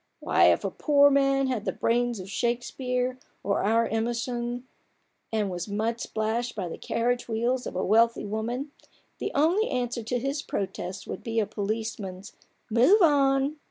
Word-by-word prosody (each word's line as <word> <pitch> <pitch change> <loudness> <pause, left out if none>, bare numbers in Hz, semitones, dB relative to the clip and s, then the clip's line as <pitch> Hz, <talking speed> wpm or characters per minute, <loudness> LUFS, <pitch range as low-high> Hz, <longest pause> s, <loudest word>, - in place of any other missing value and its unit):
Why, - - +3
if - - +4
a - - -1
poor 285 -1 +4
man 275 0 +3
had 250 -5 -2
the - - 0
brains 240 -1 0
of 185 - -7
Shakespeare, 250 +3 -1 0.2
or 200 0 0
our 225 +3 +3
Emerson, 240 +2 -2 0.6
and 210 -3 0
was 175 +1 -4
mud 220 +3 -2
splashed 225 +2 -2
by 190 -4 -3
the - - -6
carriage 245 +1 -1
wheels 240 +3 -1
of - - -7
a 185 - -1
wealthy 230 +3 +3
woman, 235 +7 -3 0.5
the - - -2
only 340 +10 +3
answer 245 -2 -2
to 225 +3 -2
his 275 +4 -2
protests 190 -4 -4
would - - -6
be 230 -1 -1
a 215 - +2
policeman's 205 -2 -4 0.2
' - - -43
move 305 - +5
on 280 -1 +3
235 Hz, 165 wpm, -27 LUFS, 220-260 Hz, 0.6 s, move